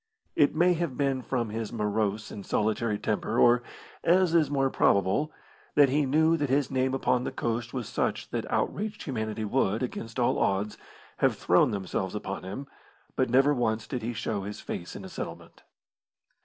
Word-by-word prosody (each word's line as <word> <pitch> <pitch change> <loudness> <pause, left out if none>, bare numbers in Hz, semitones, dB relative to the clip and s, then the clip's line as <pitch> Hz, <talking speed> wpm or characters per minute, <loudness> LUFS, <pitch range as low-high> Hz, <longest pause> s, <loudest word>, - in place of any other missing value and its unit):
It 145 0 +3
may 175 +3 +4
have 165 -6 -2
been 135 -2 +1
from 120 -3 -2
his 110 0 -4
morose 105 -1 -1
and 100 - -7
solitary 110 +1 0
temper, 110 +2 -1
or, 120 0 +5 0.4
as 175 0 +4
is 160 -4 +4
more 135 -2 +1
probable, 100 +10 +2 0.4
that 145 -2 +6
he 145 +1 +2
knew 160 +4 +3
that 145 -3 -1
his 135 0 +1
name 130 0 +1
upon 125 -1 +1
the - - -3
coast 115 0 -2
was 125 -4 -4
such - - -2
that - - -3
outraged 210 +1 -1
humanity 110 -5 -3
would, 110 -1 +1
against 115 -1 -5
all 120 - +2
odds, 100 +2 0 0.4
have - - +2
thrown - - +4
themselves 95 -1 -3
upon 100 -1 -4
him, 100 +10 -6 0.5
but 130 - +1
never 135 +4 +5
once 110 -4 0
did 125 -3 -4
he 115 +2 -3
show 110 -3 -2
his 100 +2 -6
face 85 - -6
in 95 - -7
a - - -6
settlement. - - -8
120 Hz, 180 wpm, -28 LUFS, 105-140 Hz, 0.5 s, that